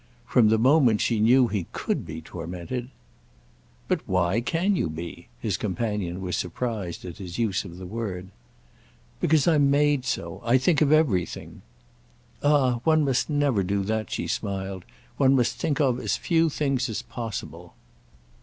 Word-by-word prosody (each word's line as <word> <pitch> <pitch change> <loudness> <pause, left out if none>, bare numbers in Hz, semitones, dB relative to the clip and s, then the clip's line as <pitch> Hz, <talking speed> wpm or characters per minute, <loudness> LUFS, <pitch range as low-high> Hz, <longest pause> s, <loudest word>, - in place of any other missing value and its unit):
From 115 -4 +4
the 110 - +4
moment 125 -2 +4
she 115 -3 +1
knew 120 +4 +5
he 100 -6 -3
could - - -2
be 80 0 -6
tormented—! 90 +10 -6 1.0
"But - - 0
why 90 +4 +1
can 180 +9 +1
you 85 - 0
be?"—his 85 +5 -5
companion 105 -4 -2
was 90 -1 -2
surprised 95 -2 -3
at 90 +1 -8
his 90 -3 -7
use 105 -5 0
of 85 -2 -9
the 90 - -8
word. 95 -3 -5 0.9
"Because 155 -1 +3
I'm 150 -4 +4
made 145 -1 +3
so—I 115 +8 0
think 150 +4 +2
of 150 -1 +4
everything." 130 - +1 0.8
"Ah 135 -5 +3
one 155 -2 +3
must 135 +1 +1
never 145 -8 +2
do 100 +1 -1
that," 110 0 -2
she - - -3
smiled. 95 -2 -3 0.3
"One 135 -1 +4
must 125 -3 +1
think 150 -1 -1
of 130 -4 +2
as - - -1
few 165 -1 +2
things 135 -4 -1
as 110 - -4
possible." 115 -4 -7
115 Hz, 155 wpm, -25 LUFS, 95-140 Hz, 1.0 s, knew